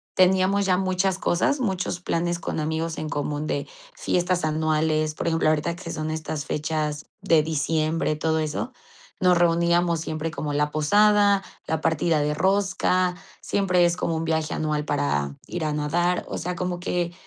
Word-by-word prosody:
teníamos 190 Hz, +2 st, +3 dB
ya 185 Hz, -1 st, +3 dB
muchas 185 Hz, 0 st, 0 dB
cosas, 285 Hz, -, +1 dB
muchos 190 Hz, -6 st, -1 dB
planes 175 Hz, 0 st, -1 dB
con -, -, -3 dB
amigos 160 Hz, +1 st, -2 dB
en 155 Hz, -, -4 dB
común 145 Hz, +1 st, -2 dB
de 145 Hz, -2 st, -2 dB, 0.3 s
fiestas 180 Hz, -, 0 dB
anuales 155 Hz, 0 st, +1 dB
por -, -, -3 dB
ejemplo, 165 Hz, -1 st, +2 dB
ahorita 155 Hz, +2 st, 0 dB
que 170 Hz, -1 st, -7 dB
son 155 Hz, -1 st, -3 dB
estas 155 Hz, -2 st, -4 dB
fechas 150 Hz, -1 st, -2 dB
de 160 Hz, -2 st, +4 dB
diciembre, 155 Hz, +1 st, 0 dB
todo 160 Hz, +1 st, 0 dB
eso, 155 Hz, -, -3 dB, 0.5 s
nos 180 Hz, -1 st, +4 dB
reuníamos 170 Hz, 0 st, +2 dB
siempre 160 Hz, 0 st, -3 dB
como 150 Hz, -3 st, -4 dB
la 150 Hz, +1 st, +1 dB
posada, 205 Hz, +6 st, +4 dB, 0.2 s
la 160 Hz, -1 st, -2 dB
partida 160 Hz, 0 st, +1 dB
de 150 Hz, 0 st, 0 dB
rosca, 185 Hz, -1 st, +1 dB, 0.3 s
siempre 180 Hz, -3 st, +2 dB
es 170 Hz, 0 st, +1 dB
como 165 Hz, -, -1 dB
un 160 Hz, 0 st, -2 dB
viaje 160 Hz, -1 st, -1 dB
anual 150 Hz, -1 st, -1 dB
para 70 Hz, -1 st, -1 dB
ir 175 Hz, -3 st, -3 dB
a 150 Hz, -, -1 dB
nadar. 175 Hz, +4 st, 0 dB
O -, -, -4 dB
sea, 180 Hz, 0 st, -3 dB
como 180 Hz, 0 st, -3 dB
que 175 Hz, -1 st, -2 dB
165 Hz, 165 wpm, -24 LUFS, 155-180 Hz, 0.5 s, de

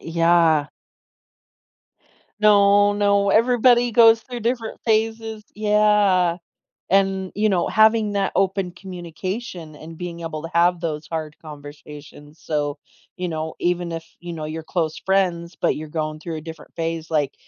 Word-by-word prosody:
Yeah. 165 Hz, -2 st, +2 dB, 1.7 s
No, 205 Hz, -1 st, +5 dB
no, 200 Hz, -1 st, +2 dB
everybody 245 Hz, +1 st, +4 dB
goes 225 Hz, 0 st, +6 dB
through 245 Hz, -2 st, -7 dB
different 230 Hz, 0 st, -3 dB
phases 220 Hz, -1 st, -1 dB
yeah, 210 Hz, -4 st, +3 dB, 0.5 s
and, 190 Hz, -1 st, +1 dB
you 215 Hz, +1 st, +1 dB
know, 180 Hz, -4 st, +1 dB
having 220 Hz, -1 st, +3 dB
that 200 Hz, -1 st, -1 dB
open 195 Hz, -1 st, 0 dB
communication 180 Hz, -1 st, -7 dB
and 160 Hz, +2 st, -11 dB
being 170 Hz, -1 st, -6 dB
able 160 Hz, -2 st, -5 dB
to 165 Hz, -, -6 dB
have 175 Hz, 0 st, +3 dB
those 155 Hz, -3 st, -4 dB
hard 155 Hz, -2 st, -5 dB
conversations 150 Hz, 0 st, -12 dB
so 145 Hz, -2 st, -2 dB, 0.4 s
you 180 Hz, -1 st, -3 dB
know, 160 Hz, -1 st, -4 dB
even 175 Hz, -1 st, -1 dB
if, 165 Hz, 0 st, -5 dB, 0.2 s
you 175 Hz, -1 st, -7 dB
know, 155 Hz, -1 st, -6 dB
you're 160 Hz, +1 st, -5 dB
close 160 Hz, -2 st, -2 dB
friends, 180 Hz, -3 st, 0 dB
but -, -, +2 dB
you're 155 Hz, 0 st, -7 dB
going 155 Hz, -1 st, -4 dB
through 165 Hz, -1 st, -5 dB
a -, -, -6 dB
different 160 Hz, -1 st, -11 dB
phase, 165 Hz, -1 st, -3 dB
like, 145 Hz, -3 st, 0 dB
175 Hz, 145 wpm, -22 LUFS, 160-205 Hz, 1.7 s, goes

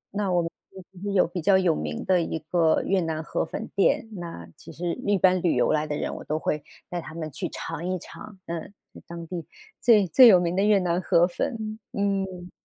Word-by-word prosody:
那 200 Hz, -3 st, 0 dB
我 175 Hz, -, +3 dB
们 165 Hz, -, -4 dB, 0.2 s
这 190 Hz, 0 st, -14 dB
边 200 Hz, +1 st, -3 dB
有 185 Hz, -, +5 dB
比 175 Hz, +1 st, -5 dB
较 190 Hz, +4 st, +5 dB
有 185 Hz, -4 st, +2 dB
名 75 Hz, 0 st, -4 dB
的 185 Hz, -2 st, +3 dB
一 160 Hz, -, -2 dB
个 160 Hz, 0 st, +2 dB
越 195 Hz, 0 st, +1 dB
南 160 Hz, -1 st, -3 dB
河 -, -, -2 dB
粉 220 Hz, -, -6 dB
店， 200 Hz, +3 st, +2 dB
那 170 Hz, -, -7 dB
其 -, -, -12 dB
实 170 Hz, 0 st, -3 dB
一 205 Hz, -1 st, +3 dB
般 185 Hz, 0 st, +3 dB
旅 170 Hz, -, +2 dB
游 -, -, +2 dB
来 155 Hz, 0 st, +1 dB
的 150 Hz, -, -2 dB
人， -, -, -3 dB
我 -, -, -8 dB
都 155 Hz, -, -2 dB
会 150 Hz, -1 st, -2 dB, 0.3 s
带 175 Hz, -1 st, -3 dB
他 155 Hz, -, -10 dB
们 155 Hz, -2 st, -5 dB
去 -, -, -4 dB
尝 165 Hz, 0 st, -6 dB
一 185 Hz, -, -1 dB
尝， 195 Hz, +3 st, -11 dB
嗯， 170 Hz, +3 st, -5 dB, 0.4 s
当 170 Hz, 0 st, -7 dB
地 170 Hz, -2 st, -5 dB, 0.4 s
最 215 Hz, -4 st, +5 dB
最 250 Hz, +8 st, +8 dB
有 190 Hz, -6 st, +8 dB
名 175 Hz, 0 st, -1 dB
的 195 Hz, -, +2 dB
越 210 Hz, 0 st, +5 dB
南 180 Hz, 0 st, 0 dB
河 175 Hz, -2 st, +4 dB
粉， 220 Hz, +2 st, -4 dB
嗯。 195 Hz, -3 st, -2 dB
180 Hz, 240 characters per minute, -25 LUFS, 165-195 Hz, 0.4 s, 最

